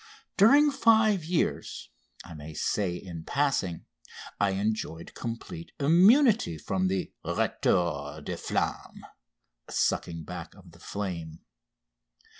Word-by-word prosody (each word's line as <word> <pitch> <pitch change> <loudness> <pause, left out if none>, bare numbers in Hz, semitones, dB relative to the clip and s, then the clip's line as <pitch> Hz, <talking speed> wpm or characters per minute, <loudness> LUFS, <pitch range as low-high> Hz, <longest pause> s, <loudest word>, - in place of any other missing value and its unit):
During 285 +9 +6
five 220 - +4
years, 165 +1 -2 0.4
I 90 - -10
may 75 -1 -9
here 80 - -9
say 95 -4 -1
in 85 -2 -8
passing, 125 - -1 0.5
I 100 - +3
enjoyed 100 -5 -3
complete 165 +9 -7
immunity 190 - +5
from 95 +4 -1
the 95 0 -2
retour 75 -5 0
de - - -4
flamme - - -3 0.6
(sucking 85 -1 -1
back - - -8
of - - -16
the - - -18
flame). 85 -5 -5
100 Hz, 110 wpm, -28 LUFS, -, 0.6 s, During